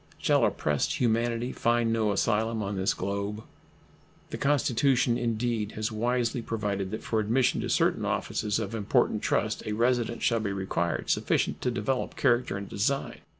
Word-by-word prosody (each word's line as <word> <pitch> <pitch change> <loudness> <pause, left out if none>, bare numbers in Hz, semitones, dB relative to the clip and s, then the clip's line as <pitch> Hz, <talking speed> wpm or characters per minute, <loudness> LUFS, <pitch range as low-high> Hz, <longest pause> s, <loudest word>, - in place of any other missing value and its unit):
Shall - - +2
oppressed 75 -2 0
humanity 120 +1 +1
find 120 -1 +1
no 110 -2 +1
asylum 110 +2 0
on 100 0 -3
this 95 +1 0
globe? 100 +3 -3 0.9
The - - -4
Constitution 130 -3 +2
indeed 115 -2 -1
has 110 +1 -2
wisely 120 +2 0
provided 105 -4 -2
that 110 - -5
for 110 - 0
admission 120 +4 +2
to - - -3
certain - - +2
offices 105 -2 -1
of 110 -1 -3
important 105 -3 +1
trust - - 0
a 105 - -1
residence 120 +1 0
shall 115 -1 +2
be 105 -2 -2
required 95 -3 -1
sufficient - - 0
to - - 0
develop 125 +2 -2
character 120 -6 +1
and 100 0 -6
design. 135 +7 -1
115 Hz, 155 wpm, -28 LUFS, 105-120 Hz, 0.9 s, Shall